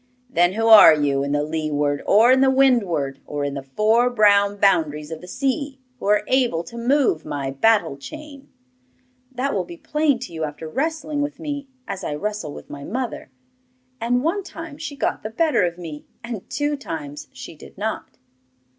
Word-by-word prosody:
'Then 175 Hz, +2 st, +3 dB
who 225 Hz, +2 st, -1 dB
are 215 Hz, -8 st, +9 dB
you 140 Hz, -2 st, 0 dB
in 140 Hz, -, -2 dB
the 145 Hz, 0 st, +1 dB
leeward, 150 Hz, -2 st, -1 dB
or 225 Hz, +5 st, +6 dB
in 260 Hz, 0 st, +5 dB
the 270 Hz, -, +5 dB
windward, 200 Hz, -, +2 dB
or 145 Hz, -1 st, -3 dB
in 140 Hz, -1 st, -2 dB
the 140 Hz, -, -4 dB
four 215 Hz, -, +2 dB
brown 205 Hz, -3 st, +4 dB
boundaries 155 Hz, -6 st, +1 dB
of 160 Hz, -, -6 dB
the 180 Hz, -, -11 dB
sea, 275 Hz, -, -2 dB, 0.2 s
who -, -, -5 dB
are 210 Hz, 0 st, +3 dB
able 245 Hz, -11 st, +1 dB
to 235 Hz, -, -12 dB
move 240 Hz, -, +1 dB
my 140 Hz, -3 st, -4 dB
battle 175 Hz, +1 st, +2 dB
chain?' 285 Hz, -, -11 dB, 0.8 s
'That 265 Hz, +2 st, -2 dB
will 190 Hz, -, 0 dB
be 170 Hz, -1 st, -11 dB
plain 300 Hz, -, +1 dB
to 235 Hz, -7 st, -8 dB
you 160 Hz, -1 st, -4 dB
after 155 Hz, +1 st, -5 dB
wrestling 310 Hz, -, -2 dB
with 290 Hz, 0 st, -4 dB
me 285 Hz, -3 st, -5 dB, 0.2 s
as 195 Hz, -1 st, -5 dB
I 145 Hz, -, -3 dB
wrestle 210 Hz, -2 st, -4 dB
with -, -, -10 dB
my 140 Hz, -1 st, -9 dB
mother. 245 Hz, -, -4 dB, 0.7 s
And 245 Hz, +2 st, 0 dB
one 340 Hz, +6 st, 0 dB
time 330 Hz, -5 st, -9 dB
she 290 Hz, -2 st, -6 dB
got -, -, -1 dB
the 215 Hz, -, -5 dB
better 305 Hz, +7 st, +1 dB
of 170 Hz, -1 st, -1 dB
me, 160 Hz, -4 st, -9 dB, 0.2 s
and 235 Hz, -5 st, -7 dB
two 290 Hz, 0 st, -1 dB
times 155 Hz, -, -7 dB
she -, -, -10 dB
did -, -, -15 dB
not. -, -, -4 dB
210 Hz, 190 wpm, -22 LUFS, -, 0.8 s, are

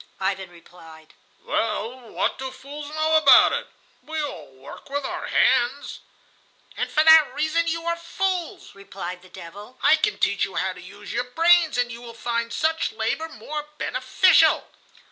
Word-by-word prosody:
Ivan 190 Hz, -1 st, -2 dB
replied: 165 Hz, -2 st, -16 dB, 0.3 s
"Well, 230 Hz, +2 st, -3 dB
what -, -, -2 dB
do 265 Hz, 0 st, -4 dB
fools 285 Hz, +3 st, -9 dB
know 310 Hz, +1 st, +2 dB
about 305 Hz, -3 st, +7 dB
it? -, -, -3 dB, 0.3 s
We 315 Hz, 0 st, -5 dB
all 185 Hz, -, -5 dB
work 130 Hz, -, -13 dB
with 285 Hz, 0 st, -3 dB
our -, -, -5 dB
hands." 250 Hz, +4 st, +1 dB, 0.8 s
"And -, -, -3 dB
for 310 Hz, -, +3 dB
that 320 Hz, -1 st, +7 dB
reason 315 Hz, +3 st, 0 dB
you 330 Hz, 0 st, -2 dB
are 340 Hz, 0 st, 0 dB
fools," 360 Hz, +1 st, -4 dB
replied 190 Hz, -2 st, -8 dB
the 185 Hz, -, -18 dB
devil. 205 Hz, +10 st, -12 dB
"I 315 Hz, -, +6 dB
can 365 Hz, +7 st, -1 dB
teach 200 Hz, -, +1 dB
you 195 Hz, -, -3 dB
how 190 Hz, -, -1 dB
to 180 Hz, -, -13 dB
use 200 Hz, +3 st, -10 dB
your 245 Hz, +1 st, -1 dB
brains, 330 Hz, +2 st, +3 dB
and 245 Hz, -1 st, 0 dB
you 235 Hz, +1 st, -9 dB
will 235 Hz, -1 st, -11 dB
find 235 Hz, 0 st, -3 dB
such 320 Hz, +4 st, -1 dB
labor 225 Hz, +9 st, -2 dB
more 300 Hz, -1 st, -7 dB
beneficial." 260 Hz, +10 st, +3 dB
255 Hz, 165 wpm, -23 LUFS, 200-315 Hz, 0.8 s, about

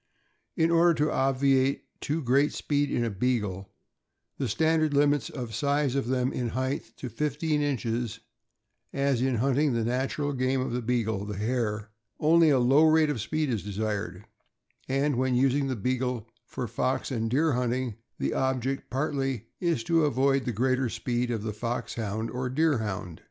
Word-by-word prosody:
In 165 Hz, 0 st, +3 dB
order 170 Hz, 0 st, +5 dB
to 150 Hz, 0 st, +1 dB
obviate 135 Hz, 0 st, +2 dB, 0.2 s
too 155 Hz, +2 st, -2 dB
great 135 Hz, +4 st, +3 dB
speed" 145 Hz, -1 st, 0 dB
in 120 Hz, -, 0 dB
a 115 Hz, -, -2 dB
Beagle, 100 Hz, -3 st, -1 dB, 0.7 s
the 135 Hz, -, 0 dB
standard 155 Hz, +4 st, +2 dB
limits 145 Hz, -2 st, +3 dB
the 125 Hz, -4 st, -6 dB
size 140 Hz, +4 st, 0 dB
of 135 Hz, -4 st, -1 dB
them 130 Hz, 0 st, 0 dB
in 120 Hz, -2 st, -2 dB
height 130 Hz, +4 st, -3 dB
to 130 Hz, -, -5 dB
fifteen 150 Hz, +4 st, -1 dB
inches, 120 Hz, -4 st, -2 dB, 0.7 s
as, 140 Hz, -3 st, +1 dB
in 130 Hz, -1 st, +1 dB
hunting 135 Hz, +4 st, +2 dB
the 115 Hz, -1 st, 0 dB
natural 135 Hz, +4 st, -1 dB
game 130 Hz, 0 st, 0 dB
of 130 Hz, -, -2 dB
the 125 Hz, +1 st, -1 dB
Beagle, 110 Hz, -4 st, -1 dB
the 105 Hz, -2 st, -5 dB
hare, 110 Hz, -1 st, -2 dB, 0.3 s
only 165 Hz, +1 st, +5 dB
a 140 Hz, -, +4 dB
low 130 Hz, +5 st, +5 dB
rate 155 Hz, -1 st, +4 dB
of 125 Hz, -7 st, -3 dB
speed 155 Hz, +4 st, -1 dB
is 110 Hz, -4 st, -1 dB
desired, 105 Hz, -2 st, -3 dB, 0.6 s
and 135 Hz, 0 st, +1 dB
when 130 Hz, 0 st, +1 dB
using 135 Hz, +2 st, +2 dB
the 130 Hz, -, -1 dB
Beagle 125 Hz, 0 st, -2 dB, 0.2 s
for 125 Hz, -, -4 dB
fox 130 Hz, +6 st, -1 dB
and 115 Hz, -3 st, -1 dB
deer 150 Hz, +6 st, +2 dB
hunting 125 Hz, -2 st, -1 dB, 0.2 s
the -, -, -1 dB
object, 130 Hz, 0 st, -1 dB
partly, 135 Hz, -3 st, -1 dB
is 170 Hz, -9 st, 0 dB
to 165 Hz, +3 st, +3 dB
avoid 135 Hz, -1 st, +2 dB
the 125 Hz, -, -1 dB
greater 130 Hz, +3 st, +1 dB
speed 120 Hz, +1 st, -2 dB
of 115 Hz, -3 st, -2 dB
the 110 Hz, -1 st, -3 dB
Foxhound 115 Hz, -1 st, -3 dB
or 125 Hz, 0 st, -3 dB
Deerhound. 110 Hz, -, -1 dB
130 Hz, 165 wpm, -27 LUFS, 115-140 Hz, 0.7 s, order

